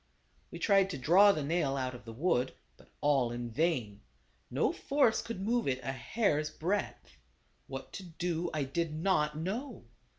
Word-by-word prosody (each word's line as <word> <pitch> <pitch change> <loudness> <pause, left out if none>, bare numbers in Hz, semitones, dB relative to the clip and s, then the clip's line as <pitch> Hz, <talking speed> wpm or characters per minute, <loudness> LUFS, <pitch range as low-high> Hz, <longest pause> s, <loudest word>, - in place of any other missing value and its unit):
We - - -8
tried 195 -2 +3
to 160 - -4
draw 180 +10 +6
the 155 -6 -2
nail 140 -3 0
out 130 -1 -2
of 120 -3 -11
the 115 - -7
wood, 130 0 0 0.2
but - - -20
all 140 -4 +3
in 120 0 -5
vain; 125 -8 0 0.5
no - - +1
force 275 -5 +2
could 230 -4 -6
move 235 +1 0
it 130 -1 0
a 135 - -2
hair's 150 - 0
breadth. 180 +6 -3 0.5
What - - -7
to 195 - -6
do 175 0 -3
I 155 -2 -1
did 155 +3 -2
not 155 -3 +1
know. 215 - -4
160 Hz, 170 wpm, -32 LUFS, 135-195 Hz, 0.5 s, draw